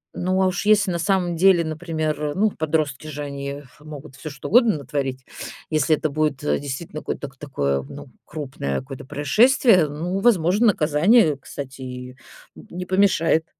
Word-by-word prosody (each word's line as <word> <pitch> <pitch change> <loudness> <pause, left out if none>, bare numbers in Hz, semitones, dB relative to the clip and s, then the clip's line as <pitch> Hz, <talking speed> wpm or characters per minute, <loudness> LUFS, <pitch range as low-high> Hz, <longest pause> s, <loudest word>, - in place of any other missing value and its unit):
Ну, 185 +1 0
а 185 - +3
уж 185 +2 -2
если 210 -3 +4
на 170 - -2
самом 180 -2 0
деле, 180 0 +4
например, 155 -2 -3
ну, 210 +2 +2
подростки 155 -3 -2
же, 150 -1 -5
они 140 0 -6 0.2
могут 150 -3 -11
всё 155 +3 -8
что 140 -1 -8
угодно 235 -4 +5
натворить. 135 -2 -4 0.5
Если 155 0 +3
это 155 - -2
будет, 150 -2 -1
э, - - +1
действительно 150 +4 -6
кой - - -4
ток 135 -2 -8
такое, 70 - -2
ну, 65 - -11 0.2
крупное 135 - -4
какое-то 130 0 -9
происшествие, 180 - +4
ну, 175 +6 -3
возможно, 200 0 +3
наказание, 160 - +4
кстати, 135 -1 -9
и 125 0 -8 0.4
не 180 +1 -8
помешает. 180 -4 +2
155 Hz, 160 wpm, -22 LUFS, 140-180 Hz, 0.5 s, угодно